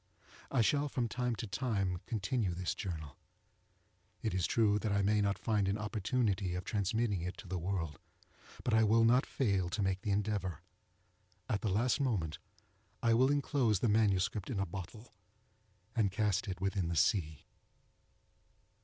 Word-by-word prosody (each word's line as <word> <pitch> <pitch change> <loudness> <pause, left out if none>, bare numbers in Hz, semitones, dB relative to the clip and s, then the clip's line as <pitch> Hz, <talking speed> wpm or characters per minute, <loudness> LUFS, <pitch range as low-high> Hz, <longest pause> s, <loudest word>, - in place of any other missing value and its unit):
I 135 - +2
shall 145 +6 +2
from 125 -3 -1
time 125 +1 -1
to 115 - -5
time 100 -4 -1
continue 105 -3 -1
this 90 0 -2
journal. 80 -8 -6 1.1
It 110 - -1
is 90 -2 +1
true 105 -3 +3
that 105 +1 -1
I 100 0 +2
may 105 +1 +3
not 100 -1 +1
find 105 -3 0
an 100 +2 0
opportunity 105 -3 -1
of 90 - -3
transmitting 105 -1 0
it 90 +2 -4
to 105 - -10
the 90 0 -3
world, 85 -4 -3 0.6
but 120 - 0
I 110 0 +5
will 115 +1 +4
not 125 +3 +4
fall 100 -8 0
to 100 +3 -1
make 95 0 0
the 105 - -3
endeavour. 100 -5 -1 0.9
At 105 - -1
the 110 - 0
last 120 +8 +1
moment 95 - -1 0.6
I 115 -1 +4
will 130 +3 +4
enclose 135 - +2
the 115 - +1
MS. 105 -4 +3 0.2
in 115 -6 -2
a 100 - +1
bottle, 100 +6 -8 0.8
and 105 -5 +2
cast 105 0 0
it 95 -2 -4
within 95 -2 0
the 85 - -2
sea. 80 -3 +1
100 Hz, 165 wpm, -34 LUFS, 95-115 Hz, 1.1 s, I